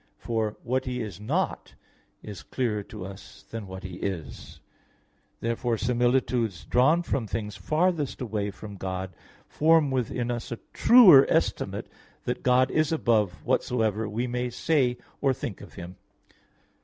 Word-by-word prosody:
For 110 Hz, -2 st, -2 dB
what 130 Hz, +2 st, -1 dB
He 125 Hz, -1 st, -3 dB
is 105 Hz, -6 st, -5 dB
not 160 Hz, -, -2 dB, 0.5 s
is 105 Hz, -4 st, -8 dB
clearer 115 Hz, -5 st, -2 dB
to 105 Hz, -4 st, -8 dB
us 95 Hz, +1 st, -11 dB
than 110 Hz, -3 st, -7 dB
what 95 Hz, 0 st, -8 dB
He 90 Hz, -1 st, -7 dB
is. 80 Hz, -5 st, -6 dB, 0.8 s
Therefore 115 Hz, 0 st, -1 dB
similitudes 120 Hz, -4 st, 0 dB
drawn 155 Hz, +8 st, +3 dB
from 130 Hz, -8 st, -2 dB
things 105 Hz, -1 st, -4 dB
farthest 155 Hz, -1 st, 0 dB
away 105 Hz, -4 st, -2 dB
from 100 Hz, 0 st, -9 dB
God 95 Hz, 0 st, -4 dB, 0.3 s
form 155 Hz, -2 st, +3 dB
within 125 Hz, -1 st, -1 dB
us 120 Hz, 0 st, -5 dB
a 120 Hz, -, -3 dB, 0.2 s
truer 185 Hz, -, +8 dB
estimate -, -, 0 dB, 0.4 s
that -, -, -3 dB
God 130 Hz, +1 st, +3 dB
is 155 Hz, -1 st, +1 dB
above 110 Hz, -, +1 dB
whatsoever 110 Hz, -3 st, 0 dB
we 115 Hz, +4 st, -2 dB
may 125 Hz, 0 st, -2 dB
say 125 Hz, 0 st, +1 dB, 0.2 s
or 135 Hz, -2 st, +3 dB
think 115 Hz, -5 st, -6 dB
of -, -, -13 dB
Him. 90 Hz, 0 st, -9 dB
120 Hz, 145 wpm, -27 LUFS, 105-130 Hz, 0.8 s, truer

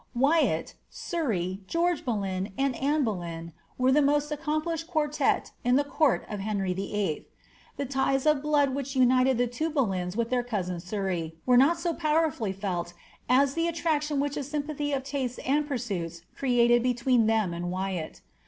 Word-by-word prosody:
Wyatt, 290 Hz, +6 st, +2 dB, 0.2 s
Surrey, 205 Hz, -, -2 dB
George 340 Hz, -, 0 dB
Boleyn, 195 Hz, -5 st, -2 dB
and 275 Hz, -2 st, +1 dB
Anne 290 Hz, +2 st, +1 dB
Boleyn, 170 Hz, -6 st, -4 dB, 0.2 s
were 255 Hz, +1 st, +3 dB
the 295 Hz, +3 st, +5 dB
most 290 Hz, +1 st, +2 dB
accomplished 310 Hz, +2 st, -2 dB
quartette 300 Hz, -3 st, 0 dB
in 245 Hz, +1 st, +3 dB
the 285 Hz, -, +4 dB
court 285 Hz, 0 st, +1 dB
of 210 Hz, -, -5 dB
Heiyy 195 Hz, -2 st, -1 dB
VIII. 195 Hz, -4 st, -2 dB, 0.5 s
The 280 Hz, -, -2 dB
ties 270 Hz, +1 st, 0 dB
of 305 Hz, -2 st, +3 dB
blood 290 Hz, -2 st, +2 dB
which 275 Hz, 0 st, -4 dB
united 255 Hz, 0 st, +4 dB
the 245 Hz, -, +3 dB
two 245 Hz, +7 st, -2 dB
Boleyns 190 Hz, -, -1 dB
with 235 Hz, +1 st, -1 dB
their 250 Hz, -1 st, +2 dB
cousin 190 Hz, -7 st, -3 dB
Surrey 180 Hz, -3 st, -3 dB
were 250 Hz, -, +4 dB
not 280 Hz, +7 st, +5 dB
so 340 Hz, 0 st, -1 dB
powerfully 305 Hz, -, +1 dB
felt 185 Hz, -3 st, -3 dB, 0.4 s
as 270 Hz, +2 st, +4 dB
the 330 Hz, +2 st, 0 dB
attraction 310 Hz, -3 st, 0 dB
which 285 Hz, 0 st, -1 dB
a 290 Hz, -, -2 dB
sympathy 290 Hz, +1 st, -3 dB
of 270 Hz, -2 st, -1 dB
tastes 260 Hz, -3 st, -3 dB
and 290 Hz, +3 st, +1 dB
pursuits 190 Hz, -, -4 dB
created 240 Hz, -2 st, +3 dB
between 245 Hz, -1 st, +2 dB
them 220 Hz, -5 st, +1 dB
and 175 Hz, +1 st, -3 dB
Wyatt. 185 Hz, -3 st, -4 dB
255 Hz, 165 wpm, -27 LUFS, 195-295 Hz, 0.5 s, the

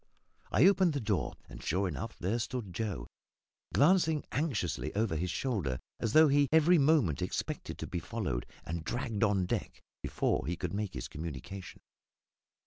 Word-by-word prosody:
I -, -, +5 dB
opened 190 Hz, -4 st, +5 dB
the 145 Hz, -, -1 dB
door; 105 Hz, -5 st, -1 dB
and, -, -, -10 dB
sure 95 Hz, +4 st, 0 dB
enough, 75 Hz, -7 st, -5 dB
there 105 Hz, +7 st, -1 dB
stood 115 Hz, -5 st, -4 dB
Joe, 105 Hz, -3 st, -3 dB, 0.7 s
glancing 160 Hz, 0 st, +4 dB
anxiously 105 Hz, -, -1 dB
over 105 Hz, -5 st, +1 dB
his 90 Hz, +4 st, -1 dB
shoulder, 95 Hz, -, -1 dB, 0.2 s
as 115 Hz, -, -1 dB
though 155 Hz, 0 st, +8 dB
he 145 Hz, 0 st, +4 dB
every 160 Hz, +2 st, +6 dB
moment 140 Hz, -, +3 dB
expected -, -, -3 dB
to -, -, -5 dB
be 90 Hz, -, -3 dB
followed 90 Hz, -, -3 dB, 0.2 s
and 85 Hz, 0 st, -4 dB
dragged 115 Hz, +2 st, -2 dB
on 100 Hz, -4 st, +3 dB
deck -, -, -3 dB, 0.2 s
before -, -, 0 dB
he 90 Hz, -, -1 dB
could 90 Hz, 0 st, -4 dB
make 100 Hz, -3 st, -3 dB
his -, -, -4 dB
communication. 80 Hz, +5 st, -7 dB
105 Hz, 160 wpm, -32 LUFS, 90-140 Hz, 0.7 s, though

